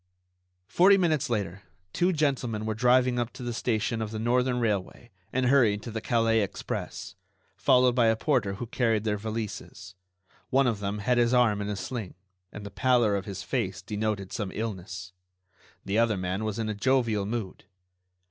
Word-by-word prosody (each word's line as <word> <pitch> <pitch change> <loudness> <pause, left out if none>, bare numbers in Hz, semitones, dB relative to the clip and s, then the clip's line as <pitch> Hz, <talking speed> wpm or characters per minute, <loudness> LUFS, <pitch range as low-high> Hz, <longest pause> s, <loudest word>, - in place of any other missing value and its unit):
Forty 190 - +5
minutes 160 -8 +1
later 100 -5 -2 0.3
two 180 +2 +2
gentlemen 130 -9 -1
were 110 - -1
driven 125 +2 +3
up 120 0 -2
to 130 -1 -9
the 120 -1 -3
station 115 0 -1
of 110 - -3
the 110 - -5
Northern 125 +2 +1
Railway 110 +1 -2 0.2
and 130 0 0
hurried 120 -6 +3
to 120 - -6
the 110 0 -4
Calais 115 -1 +2
express, 100 - -5 0.4
followed 125 -1 +4
by 120 -2 +3
a 110 - +4
porter 110 -6 0
who 120 - -5
carried 115 -2 0
their 105 -2 -1
valises. 110 -2 -6 0.6
One 135 +1 +3
of 115 -4 0
them 100 0 -3
had 120 +4 +1
his 120 +1 +3
arm 110 -4 +3
in 100 - -3
a 105 - -2
sling, 110 -1 -5 0.4
and 105 - -9
the 100 - -7
pallor 120 -2 +2
of 100 -1 -3
his 100 -3 -6
face - - -2
denoted 105 -2 -3
some 105 -5 -3
illness. 95 -4 -5 0.7
The 100 +3 +1
other 115 -3 +2
man 95 +3 -2
was 110 -2 -3
in 115 -1 -2
a 110 - -1
jovial 110 -3 +1
mood. 110 -6 -5
110 Hz, 180 wpm, -27 LUFS, 105-125 Hz, 0.7 s, Forty